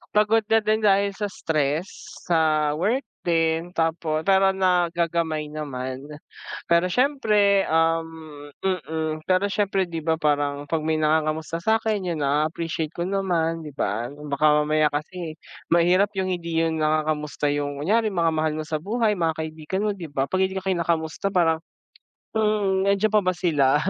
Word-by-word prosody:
pagod 215 +1 +4
na 225 - +5
din 215 +1 +1
dahil 200 -1 +3
sa 210 - -1
stress 155 +1 -1 0.4
sa 155 -3 +2
work 225 - 0 0.2
din, 165 0 0
tapo 160 -1 0
pero 195 0 +4
nagagamay 170 -4 0
naman. 130 -2 -5 0.6
Pero, 170 +1 +4
siyempre, 210 -5 +3
um, 165 0 +2 0.6
mm, 160 -3 -2
pero 185 +1 +3
siyempre, 195 -2 +1
di 165 - -5
ba, 160 - +3
parang 145 -1 0
pag 165 -1 0
may 160 0 +1
nangangamusta 155 +1 0
sa 220 +2 +3
akin, 210 -4 -1
'yun, 155 - -5
ah, 145 +2 +2
na-appreciate 160 0 -3
ko 170 - -4
naman, 170 -4 -1
di 150 - -8
ba? 115 -3 -1
Baka 145 0 -2 0.2
mamaya 155 0 +2
kasi 160 +2 -4 0.4
mahirap 180 +4 +4
yung 190 0 0
hindi 170 -2 -1
yun 160 -1 0
nangangamusta 155 -1 0
yung 145 -1 -3
kunyari 215 +7 +2
mga 165 -2 +2
mahal 155 0 0
mo 155 - -3
sa 155 0 -2
buhay, 215 +5 0
mga 165 -2 +1
kaibigan 160 +5 -4
mo, 210 - +1
di 175 - -6
ba, 135 -1 -1
pag 185 - 0
hindi 190 - -4
ka 190 - -4
kinakamusta 170 +1 -1
parang, 165 -3 +3 0.8
mhm, 205 -3 +1
nandiyan 200 +2 +2
pa 215 - +5
ba 185 0 +1
sila? 145 -6 +2
165 Hz, 160 wpm, -24 LUFS, 155-190 Hz, 0.8 s, na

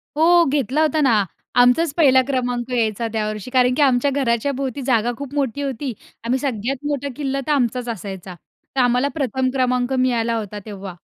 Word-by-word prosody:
हो 340 +3 +5
घेतला 275 +1 0
होता 310 0 +2
ना. 230 -7 +4 0.4
आमचाच 280 +5 +3
1ला 265 -5 +6
क्रमांक 245 -2 -2
यायचा 230 -2 0
त्यावर्षी. 215 +1 -3
कारण 250 -1 +3
की 295 - 0
आमच्या 270 0 +3
घराच्या 260 -1 0
भोवती 270 0 -4
जागा 240 -2 +2
खूप 280 -1 -7
मोठी 280 -1 -1
होती. 270 -2 -3 0.3
आम्ही 250 +3 0
सगळ्यात 260 +1 -3
मोठा 285 -1 -2
किल्ला 275 -1 -2
तर - - +1
आमचाच 250 -3 0
असायचा. 190 -4 -6 0.4
तर - - 0
आम्हाला 250 +2 +2
प्रथम 260 -3 0
क्रमांक 250 -1 0
मिळाला 240 -3 +1
होता 210 -1 -5
तेव्हा. 195 -4 -8
255 Hz, 175 wpm, -21 LUFS, 230-275 Hz, 0.4 s, 1ला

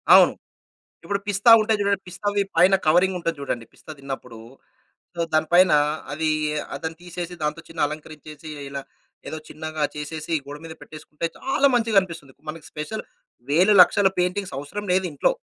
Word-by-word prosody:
అవును. - - +7 0.7
ఇప్పుడు 200 0 -1
పిస్తా 205 +3 +4
ఉంటాయి 215 0 +1
జూడండి. 200 -1 +1
పిస్తా‌వి 205 +2 -1
పైన 185 +3 +6
కవరింగ్ 180 +3 +4
ఉంటది 165 -1 -2
జూడండి. 125 -4 -3
పిస్తా - - -12
తిన్నప్పుడు. 135 -4 -7 0.8
సో 170 - -2
దాని 155 0 +3
పైన 185 0 +6 0.4
అది 155 +2 0 0.4
ఆ - - -3 0.3
తీసేసి 175 0 -6
దానితో 150 +2 -2 0.3
అలంకరించేసి 155 0 -9 0.2
ఇలా 140 0 -5 0.5
ఏదో 160 - -5
చిన్నగా 155 -1 -4
చేసేసి 155 +2 -5
గోడ 145 +1 -8
మీద 160 - -8
పెట్టేసుకుంటే 155 +1 -7
చాలా 275 +1 +2
మంచిగనిపిస్తుంది. 190 - +1 0.2
మనకి 155 0 -7
స్పెషల్ 150 +8 -5 0.5
వేలు, 180 +8 +5
లక్షల 195 +2 +5
పెయింటింగ్స్ 180 0 -1
అవసరం 145 +9 -6
లేదింట్లో. 180 - +1
165 Hz, 140 wpm, -23 LUFS, 150-195 Hz, 0.8 s, అవును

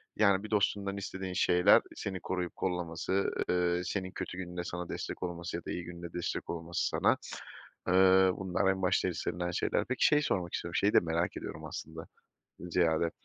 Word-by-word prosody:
Yani, 100 -2 +4
bir 110 - -8
dostundan 100 -1 +1
istediğin 95 -1 -5
şeyler; 90 0 +5
seni 95 -2 -4
koruyup 90 -2 -3
kollaması, 90 +1 -1 0.2
eee, 90 0 +2
senin 95 -2 -3
kötü 90 - -5
gününde 90 -1 -4
sana 90 0 -5
destek - - -5
olması 85 -1 -4
ya 85 - -6
da - - -4
iyi 90 - -3
gününde 85 -1 -8
destek 90 - -3
olması 85 0 -2
sana, - - +2 0.7
ııı, 95 0 +6
bunlar 95 0 +1
en 95 0 -3
başta 95 0 +2
istenilen 90 +1 -3
şeyler. - - 0
Peki, 130 - +1
şeyi 150 0 +5
sormak 90 - -1
istiyorum, 85 0 -3
şeyi 100 +1 +3
de - - +8
merak 85 +1 -1
ediyorum 80 0 -6
aslında, 80 +2 -7 0.5
ziyade, 85 -2 +1
90 Hz, 170 wpm, -31 LUFS, 85-95 Hz, 0.7 s, de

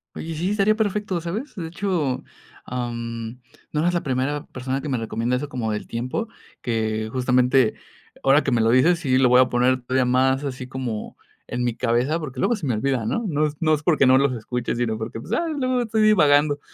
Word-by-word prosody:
Oye, 165 - -5
sí, 170 +4 -2
estaría 210 +1 +2
perfecto, 205 -4 -1
¿sabes?, 205 - -5
de 170 -5 -5
hecho, 165 -6 -2 0.4
am, 115 -1 -5 0.3
no 150 - 0
eres 175 +2 +1
la 175 - 0
primera 135 +2 -1
persona 130 +1 -4
que 150 - -5
me 130 - 0
recomienda 115 +2 -1
eso 140 +4 -3
como 120 -5 -2
del 105 - -3
tiempo, 125 - -3 0.4
que, 110 -2 -1
justamente, 125 -1 +2 0.5
ahora 140 +3 +5
que - - 0
me 120 -2 +2
lo 115 +1 +3
dices 160 +8 +4
si 130 -6 +1
lo 130 -2 +4
voy 125 +1 +6
a 130 - +4
poner 125 +1 +2
todavía 130 +1 +1
más 130 +2 +2
así 130 -2 -5
como, 125 -4 -5 0.3
en 125 0 -3
mi 120 -2 -1
cabeza, 125 +7 +1
porque 135 -5 -7
luego 240 - +2
se 195 - -6
me 125 - 0
olvida, 125 +1 -1
¿no?, 230 - -1
no 155 -3 +1
es 150 0 -3
no 155 -1 +3
es, 150 - -7
porque 155 -6 +3
no 130 0 +6
los 135 -1 +2
escuche, 120 +1 -3
sino, 120 -2 -1
porque, 110 +1 -5
pues, 120 - -10
ya, 290 +9 +1
luego 255 -5 0
estoy 220 -1 0
divagando, 150 -8 +4
130 Hz, 215 wpm, -23 LUFS, 125-165 Hz, 0.5 s, voy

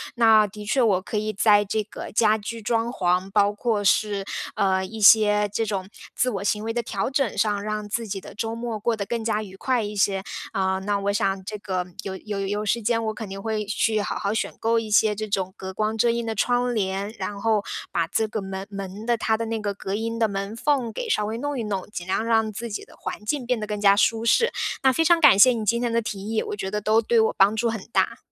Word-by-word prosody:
那 220 -3 +5
的 210 +1 -10
确 260 +5 +1
我 205 -6 +3
可 210 - -4
以 215 +1 -1
在 205 0 +4
这 210 +2 -1
个 210 - -9
家 215 0 +4
居 220 +2 -5
装 225 +1 0
潢， 185 -4 0
包 200 +1 +3
括 210 -1 -1
是， 200 0 +2 0.3
呃， 190 -3 +1
一 220 +4 -7
些 210 0 +6
这 225 - 0
种 195 -3 -3 0.3
自 250 - +1
我 200 -3 -4
行 210 +1 0
为 225 +1 -2
的 240 - 0
调 220 +2 -3
整 270 -7 0
上， 205 -1 +1
让 210 0 -3
自 230 +2 -3
己 195 -1 -4
的 - - -12
周 225 +2 -3
末 230 -2 -4
过 230 +2 0
得 200 -2 -4
更 230 +1 -3
加 215 -1 0
愉 190 -2 -11
快 245 +3 0
一 210 0 -5
些。 195 -1 +1 0.3
呃， 190 0 0
那 200 +1 -1
我 200 0 -1
想 195 -1 0
这 210 +1 -5
个 185 -3 -2 0.2
有 190 - -5
有 205 0 -5
有 205 +2 -2
时 235 +3 +1
间 230 +1 0
我 220 - -1
肯 215 -2 -7
定 195 0 -6
会 215 +1 -2
去 215 +1 +1
好 - - -3
好 200 +1 -1
选 225 - -1
购 230 +1 +2
一 225 -1 -6
些 210 0 +4
这 215 +1 -4
种 190 -2 -1
隔 190 0 -7
光 215 +3 -1
遮 230 +2 +3
荫 235 0 -1
的 225 - -2
窗 245 +3 +1
帘， 200 0 -2
然 205 -1 -4
后 215 -1 +1 0.3
把 170 -1 0
这 220 +6 0
个 215 0 -4
门 190 0 -6
门 195 +1 -7
的 240 0 +2
它 220 -1 0
的 230 - -3
那 225 -1 -3
个 205 -1 -3
隔 195 0 -5
音 230 +2 -2
的 225 -1 +2
门 200 +1 -4
缝 255 -2 0
给 - - -5
稍 210 - +1
微 220 +2 -3
弄 290 +1 -3
一 - - -2
弄， 195 -3 -3
尽 175 - -5
量 205 +4 0
让 225 -1 +2
自 230 +2 -6
己 205 - -4
的 - - -17
环 210 - -6
境 255 +4 -2
变 245 -1 0
得 210 - -4
更 210 -1 -3
加 200 -1 +5
舒 225 +2 +2
适。 470 - +4 0.3
那 265 - +5
非 325 +5 +1
常 340 0 +4
感 295 -10 +7
谢 255 +5 +8
你 230 -3 -2
今 235 +3 +1
天 240 -1 -1
的 230 - +2
提 205 -3 -5
议， 225 - +1
我 - - -4
觉 190 -1 -4
得 210 0 -2
都 215 +2 +3
对 230 +1 +2
我 220 - +2
帮 200 +3 +5
助 230 +2 +1
很 225 -1 -3
大。 - - +1
215 Hz, 280 characters per minute, -24 LUFS, 200-230 Hz, 0.3 s, 谢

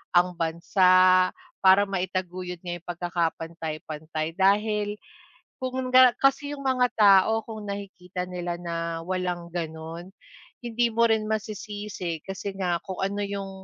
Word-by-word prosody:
ang 175 +1 +5
bansa, 185 +2 +4 0.3
para 190 +2 +6
maitaguyod 185 -1 -3
ngayong 175 -1 -4
pagkakapantay-pantay 165 -2 -3
dahil 210 +1 +2 0.7
kung 255 0 -2
nga 255 -1 +8
kasi 280 +1 +2
yung 285 - -9
mga 255 -1 +3
tao 205 +1 +6
kung 220 -2 -7
nakikita 190 -2 -6
nila 175 -1 -4
na 165 -1 -3
walang 180 -2 -2
ganun, 165 +1 -5 0.5
hindi 240 0 0
mo 235 +1 +4
rin 220 -1 +2
masisisi 210 -5 -4
kasi 195 +1 -5
nga 180 -3 0
kung 190 -2 -6
ano 200 +1 -1
yung, 200 -1 -4
185 Hz, 125 wpm, -26 LUFS, 175-210 Hz, 0.7 s, nga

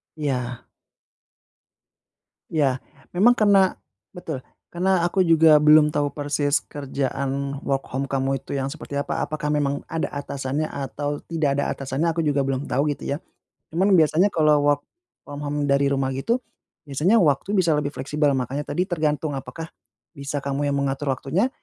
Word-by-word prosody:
Iya. 125 -5 -3 1.8
Ya, 135 -5 +1 0.3
memang 220 +8 +5
karena 200 -3 +4 0.4
betul, 160 -7 -5 0.3
karena 180 0 +2
aku 185 +2 +1
juga 160 -3 +6
belum 150 0 +6
tahu 145 -1 +1
persis 145 0 0
kerjaan 140 0 -3
work 135 -1 -1
home 135 +2 -2
kamu 135 -1 -1
itu - - -6
yang 135 0 -2
seperti 145 -2 -6
apa. 140 - -2
Apakah 150 -1 -3
memang 145 -1 0
ada 165 0 -3
atasannya 140 +1 -3
atau 145 +1 -4
tidak 150 -4 0
ada - - +1
atasannya? 135 +5 -1
Aku 165 - 0
juga 145 -2 +2
belum 135 +1 -2
tahu 145 +3 0
gitu - - -14
ya. 145 - -2 0.6
Cuman 190 +5 +2
biasanya 165 +4 +4
kalau 150 -3 +3
work 145 -1 +3 0.5
from 145 0 -7
home 145 0 -2
dari 140 0 +3
rumah 135 -1 0
gitu 135 - 0 0.5
biasanya 150 - +2
waktu 175 +4 +2
bisa 170 -3 +3
lebih 145 -1 0
fleksibel. 145 +2 0
Makanya 130 +3 -2
tadi 160 +5 0
tergantung 155 -4 -1
apakah 160 +4 -7 0.4
bisa 140 0 -4
kamu 140 +1 -1
yang 140 - 0
mengatur 140 +1 -1
waktunya 155 - 0
145 Hz, 155 wpm, -23 LUFS, 140-160 Hz, 1.8 s, juga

